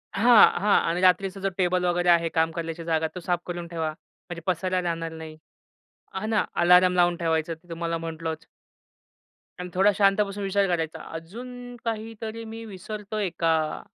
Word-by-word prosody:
हां, 230 Hz, +2 st, +7 dB
हां. 205 Hz, 0 st, +4 dB
आणि 175 Hz, +2 st, -1 dB
रात्रीचा 190 Hz, +1 st, +3 dB
जो 195 Hz, 0 st, -1 dB
टेबल 180 Hz, -1 st, +1 dB
वगैरे 175 Hz, 0 st, +1 dB
आहे 170 Hz, -1 st, +4 dB
काम 160 Hz, 0 st, +1 dB
करण्याची 165 Hz, 0 st, -5 dB
जागा 160 Hz, -1 st, 0 dB
तो -, -, -4 dB
साफ 175 Hz, 0 st, -1 dB
करून 175 Hz, -1 st, -5 dB
ठेवा. 165 Hz, -2 st, -2 dB
म्हणजे 170 Hz, +1 st, -12 dB
पसरायला 185 Hz, +1 st, 0 dB
जाणार 165 Hz, -1 st, -3 dB
नाही. 160 Hz, -1 st, -9 dB, 0.8 s
हां 215 Hz, +3 st, -3 dB
ना. 220 Hz, -, +2 dB
अलार्म 180 Hz, +1 st, +5 dB
लावून 175 Hz, -1 st, +3 dB
ठेवायचं 165 Hz, -1 st, 0 dB
ते 170 Hz, +2 st, -16 dB
तुम्हाला 165 Hz, 0 st, -3 dB
म्हंटलच. 160 Hz, -1 st, -5 dB, 1.1 s
आणि 180 Hz, 0 st, -5 dB
थोडा 195 Hz, +3 st, +5 dB
शांत 200 Hz, 0 st, +4 dB
बसून 200 Hz, +1 st, -6 dB
विचार 195 Hz, 0 st, +2 dB
करायचा. 165 Hz, -3 st, -2 dB
अजून 245 Hz, +9 st, -8 dB
काहीतरी 225 Hz, 0 st, -5 dB
मी 225 Hz, +1 st, -8 dB
विसरतोय 210 Hz, 0 st, -5 dB
का? 160 Hz, -2 st, +1 dB
180 Hz, 165 wpm, -25 LUFS, 165-200 Hz, 1.1 s, हां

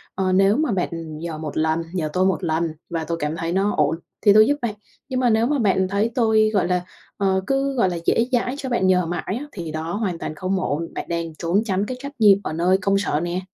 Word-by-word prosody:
"Ờ, 190 Hz, -1 st, 0 dB
nếu 195 Hz, +5 st, +4 dB
mà 305 Hz, -6 st, +1 dB
bạn 165 Hz, -4 st, -3 dB
nhờ 160 Hz, 0 st, -5 dB
một 155 Hz, -1 st, -6 dB
lần, 160 Hz, +1 st, +1 dB
nhờ 160 Hz, -5 st, -1 dB
tôi 185 Hz, +1 st, +2 dB
một 190 Hz, 0 st, 0 dB
lần 165 Hz, 0 st, 0 dB, 0.2 s
và 165 Hz, -2 st, -2 dB
tôi 165 Hz, +1 st, -3 dB
cảm 150 Hz, +2 st, -1 dB
thấy 165 Hz, 0 st, -2 dB
nó 195 Hz, +2 st, +1 dB
ổn 150 Hz, +2 st, +2 dB, 0.3 s
thì 205 Hz, -2 st, +6 dB
tôi 215 Hz, +1 st, +7 dB
giúp 290 Hz, -, +3 dB
bạn 230 Hz, -3 st, -1 dB, 0.4 s
nhưng 255 Hz, -, -1 dB
mà 250 Hz, -1 st, +3 dB
nếu 225 Hz, +1 st, +3 dB
mà 290 Hz, -2 st, 0 dB
bạn 190 Hz, -3 st, +2 dB
thấy 205 Hz, +4 st, 0 dB
tôi, 220 Hz, -3 st, +3 dB
gọi 195 Hz, -4 st, +2 dB
là, 180 Hz, 0 st, +1 dB, 0.4 s
ờ, 190 Hz, -2 st, +1 dB
cứ, 275 Hz, 0 st, +1 dB
gọi 210 Hz, -7 st, +3 dB
là, 175 Hz, -, -3 dB
dễ 230 Hz, -, +3 dB
dãi 250 Hz, +1 st, 0 dB
cho 265 Hz, -, -5 dB
bạn 215 Hz, -6 st, +1 dB
nhờ 180 Hz, -1 st, +3 dB
mãi 175 Hz, +4 st, -3 dB
á, 295 Hz, -, -7 dB
thì 170 Hz, -5 st, -6 dB
đó 160 Hz, +2 st, -4 dB
hoàn 200 Hz, -5 st, -2 dB
toàn 155 Hz, -, -5 dB
không 185 Hz, +3 st, -1 dB
ổn, 165 Hz, -1 st, -3 dB
bạn -, -, -4 dB
đang 165 Hz, -2 st, -3 dB
trốn 175 Hz, +7 st, 0 dB
tránh 200 Hz, -1 st, 0 dB
cái 255 Hz, +2 st, -5 dB
trách 280 Hz, +2 st, -6 dB
nhiệm 205 Hz, -3 st, +7 dB
ở -, -, -3 dB
nơi 175 Hz, +4 st, +2 dB
công 195 Hz, +1 st, +2 dB
sở." 170 Hz, -6 st, 0 dB
nè. 175 Hz, +2 st, -2 dB
185 Hz, 260 wpm, -22 LUFS, 165-215 Hz, 0.4 s, tôi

